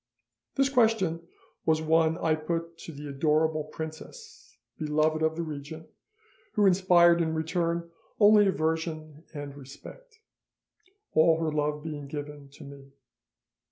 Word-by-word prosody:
"This 275 0 +3
question 220 -10 +1 0.4
was 160 -1 +2
one 160 0 +2
I 160 - +1
put 165 +1 -4
to - - -9
the 150 -1 -9
adorable 155 +2 +1
princess, 160 - -10 0.2
beloved 155 0 +1
of 160 0 +1
the 170 - -3
regent, 155 +1 -8 0.7
who 210 -3 +3
inspired 175 -2 +5
in 160 -1 -1
return 170 +1 -1 0.3
only 210 -1 +6
aversion 160 -2 -2
and 145 -1 -7
respect, 145 - -13 1.0
all 160 +1 +4
her 160 -1 -1
love 150 0 -1
being 150 -3 -6
given 145 -1 -8
to - - -13
me. 140 -1 -13
160 Hz, 125 wpm, -28 LUFS, 150-170 Hz, 1.0 s, only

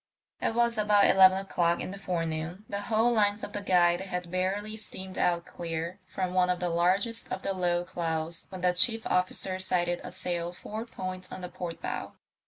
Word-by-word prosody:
It 225 - 0
was 235 -2 +2
about 210 -1 +5
eleven 190 0 +7
o'clock 175 -3 +1
in - - -4
the 200 - -8
forenoon; 170 +1 -3
the 200 0 -3
whole 225 +2 +2
length 205 -2 +2
of 205 - -6
the 205 - -3
Guide 175 -2 +3
had 180 -2 -4
barely 195 +4 -1
steamed 190 -3 -7
out 170 -1 +1
clear 170 0 -5
from 185 -1 -3
one 180 -1 +3
of 180 -1 +1
the 180 - -1
largest 185 +7 +1
of - - -3
the 195 - -1
low 175 -1 0
clouds 165 -1 -3
when 185 -2 -8
the 180 0 +3
chief 225 +5 +4
officer 185 +1 0
sighted 175 -2 0
a - - -7
sail 175 -1 -3
four 220 +5 -6
points 185 -3 -6
on - - -7
the 180 - -5
port 170 -2 -6
bow. - - -4
185 Hz, 195 wpm, -29 LUFS, 175-200 Hz, -, eleven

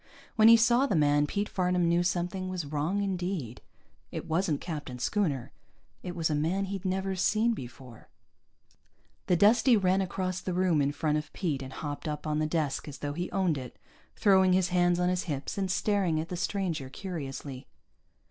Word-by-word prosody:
When 220 -1 +6
he 230 0 +9
saw 240 +4 +4
the 200 - 0
man, 145 -1 +3
Pete 205 +6 -2
Farnam 180 -2 +1
knew 170 +1 +3
something 180 +1 -1
was 180 -4 -3
wrong 155 +8 -1
indeed. 180 - -3 0.5
It - - -5
wasn't 160 -2 0
Captain 145 -7 -6
Schooner. 140 - -1 0.5
It 180 -1 -6
was 165 -2 0
a - - +1
man 165 +7 0
he'd 195 0 -5
never 190 +1 -1
seen 220 +5 +2
before. 125 - -10 1.2
The 180 - +4
Dustie 225 +5 +5
ran 190 -1 +2
across 185 0 -3
the 185 - -3
room 180 -5 +2
in 140 0 +1
front 150 +1 0
of 150 0 -9
Pete 155 -8 -2
and 130 0 -7
hopped 145 +2 -5
up 150 0 -4
on 150 0 0
the 155 - +1
desk 155 -3 -1
as 145 - -7
though 145 0 -4
he 175 +4 -3
owned 180 -6 0
it, 125 -2 -9 0.4
throwing 190 -2 +4
his 185 -1 +2
hands 175 -1 +2
on 180 - +2
his 180 0 0
hips 140 -5 -4
and 195 -1 -1
staring 190 -4 +1
at 160 - -4
the 180 - -3
stranger 175 -7 -2
curiously. 140 -5 -6
175 Hz, 185 wpm, -29 LUFS, 150-190 Hz, 1.2 s, he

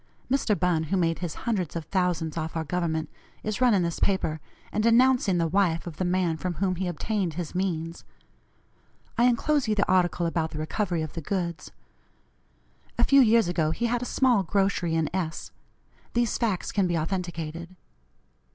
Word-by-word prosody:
Mr. 240 -6 +1
Bunn, 175 -3 +1
who 190 +5 0
made 165 -2 +1
his 175 -3 -4
hundreds 195 -10 -1
of 165 -2 -4
thousands 175 -3 -1
off 160 0 -4
our 160 - -1
government, 160 0 -1 0.4
is 215 +3 -3
running 220 -8 +4
this 170 -1 -2
paper, 190 -5 0 0.3
and 215 - 0
denouncing 230 -3 +4
the 170 - +2
wife 170 -2 +1
of 165 -3 -7
the - - -1
man 175 -2 +1
from 180 +1 -3
whom 185 +1 0
he 185 0 -2
obtained 180 0 -2
his 175 -2 -4
means. 170 -3 -2 1.1
I 240 - +3
enclose 255 +3 +2
you 215 - +1
the 200 - +1
article 180 -2 +2
about 165 -1 0
the 155 - -7
recovery 170 +2 -1
of 155 - -6
the 165 - -5
goods. 170 0 -3 1.3
A - - +3
few 275 0 +6
years 230 -4 +5
ago 165 -3 +1
he 230 +9 -1
had 240 +1 0
a - - -3
small 250 -5 +3
grocery 195 -3 0
in 160 -1 +1
S. 170 -4 -3 0.6
These 235 -1 +1
facts 215 -7 -1
can 195 -3 +1
be 175 -1 0
authenticated. 170 0 -4
180 Hz, 180 wpm, -26 LUFS, 165-205 Hz, 1.3 s, few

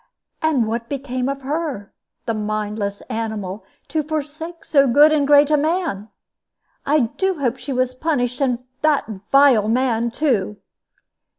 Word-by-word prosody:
"And 300 -7 +2
what 230 +1 -3
became 265 -2 -3
of 275 -1 -4
her 285 -7 -3 0.3
the 230 - -1
mindless 210 -1 -3
animal, 215 -3 -4 0.3
to 315 - 0
forsake 310 +2 -5
so 275 -2 +4
good 290 +5 +6
and 290 -2 +2
great 290 0 +5
a 300 - +5
man! 305 - -1 0.8
I 300 +1 +4
do 380 +11 -1
hope 260 -3 -1
she 280 - -6
was 255 -1 0
punished, 255 -3 -1
and 250 -2 0 0.2
that 305 -2 +2 0.3
vile 270 -6 +5
man 235 0 +1
too." 230 -7 0
260 Hz, 140 wpm, -20 LUFS, 225-295 Hz, 0.8 s, good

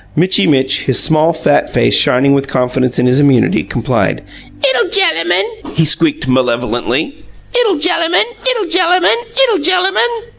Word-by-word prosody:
Mitchy 180 +5 +1
Mitch, 135 -3 +1
his 130 - 0
small, 160 +1 +2
fat 165 - -1
face - - 0
shining 140 +3 +3
with 140 0 -1
confidence 125 -1 -2
in 125 - +1
his 125 +2 +2
immunity, 140 -4 +2
complied. - - -3 0.4
"'Ittle 265 +5 +1
gellamun!" 430 +3 -1
he 165 - +2
squeaked 155 -2 -1
malevolently. 125 - -2 0.3
"'Ittle 465 -6 +2
gellamun! 335 +2 +1 0.2
'Ittle - - 0
gellamun! 360 +2 +2
'Ittle 470 -4 +1
gellamun!" 380 +8 +1
165 Hz, 140 wpm, -12 LUFS, -, 0.4 s, shining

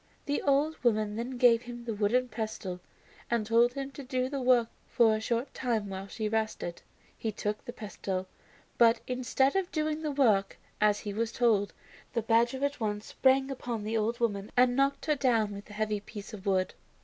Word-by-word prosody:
The 290 0 0
old 290 +2 +1
woman 215 -3 +2
then 245 +3 -4
gave 240 -2 +5
him 240 -1 -8
the 230 - -2
wooden 220 +5 +1
pestle 215 -5 -4 0.5
and 235 -2 +1
told 235 +2 +4
him 275 0 -4
to 280 - -9
do 255 0 -1
the 280 -1 -3
work 250 -2 +4 0.2
for 230 -3 +4
a 215 - -3
short 235 +4 -1
time 225 -5 -1
while 190 0 -6
she 215 +2 -3
rested. 215 -5 -2 0.3
He 220 - -3
took 210 0 -3
the - - -6
pestle, 195 -4 -4 0.5
but 230 -1 +6
instead 255 +3 +1
of 385 -2 0
doing 310 0 -1
the 310 - -2
work 230 -9 +2 0.2
as 210 -1 +3
he 205 - -4
was 230 +2 -1
told, 220 -5 +2 0.4
the 230 -3 0
badger 235 +4 +2
at 285 0 -3
once 210 -2 -2
sprang 265 +1 +2
upon 240 -4 -4
the 220 +2 -2
old 225 +2 0
woman 205 -4 -1
and 245 0 +5
knocked 275 +1 +1
her 305 - +3
down 230 -7 +1
with 200 0 -8
the 210 - -12
heavy 215 0 -1
piece 205 0 -10
of 200 -2 -8
wood. 185 -1 +1
230 Hz, 195 wpm, -30 LUFS, 210-255 Hz, 0.5 s, but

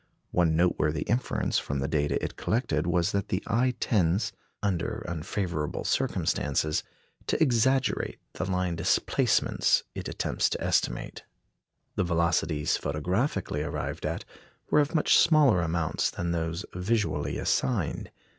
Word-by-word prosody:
One 85 -3 +2
noteworthy 80 -3 +1
inference 120 +2 0
from 70 - -3
the 70 0 -1
data 75 -1 +1
it - - -3
collected - - 0
was 90 +2 +2
that 100 0 -1
the 100 -2 -2
eye 125 +2 +1
tends, 95 -2 +1 0.3
under 95 -5 -1
unfavourable 85 -2 -3
circumstances, 75 +2 0 0.5
to - - 0
exaggerate 130 -2 +2 0.2
the 95 - -3
line 90 -2 0
displacements 80 - +2
it - - -5
attempts - - 0
to - - -3
estimate. - - -1 0.8
The - - +3
velocities 85 -3 +1
photographically 90 - -1
arrived 75 -1 -3
at - - -4 0.5
were 150 - +5
of 150 +3 +1
much 155 - +5
smaller 150 - +5
amounts 80 -1 0
than 85 - -3
those 85 +2 -2
visually 105 +4 -1
assigned. 65 -1 0
90 Hz, 125 wpm, -28 LUFS, 80-105 Hz, 0.8 s, were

